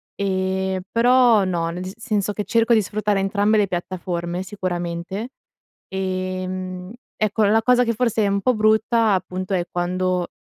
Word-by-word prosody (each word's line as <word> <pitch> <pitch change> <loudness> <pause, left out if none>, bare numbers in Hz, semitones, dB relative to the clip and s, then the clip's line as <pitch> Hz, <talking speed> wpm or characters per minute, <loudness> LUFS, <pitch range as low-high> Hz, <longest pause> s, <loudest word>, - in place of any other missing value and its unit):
ehm, 190 -1 -1
però 240 -2 +5
no, 170 -3 -1
nel 175 +2 -5
dis 185 +1 -6
senso 210 -3 -1
che 210 - -3
cerco 230 +2 +2
di 215 - +3
sfruttare 210 0 -1
entrambe 205 +2 +2
le 205 -1 +3
piattaforme 175 -1 -3
sicuramente, 180 +2 -4 0.6
ehm, 185 -1 -4 0.3
ecco, 215 0 +1
la 220 +2 +3
cosa 250 +1 +4
che 230 - 0
forse 225 -2 +1
è - - +2
un 200 0 0
po' 255 +5 +2
brutta 220 +1 +3
appunto, 185 0 -2
è 175 -2 0
quando 180 0 -1
190 Hz, 155 wpm, -22 LUFS, 185-215 Hz, 0.6 s, però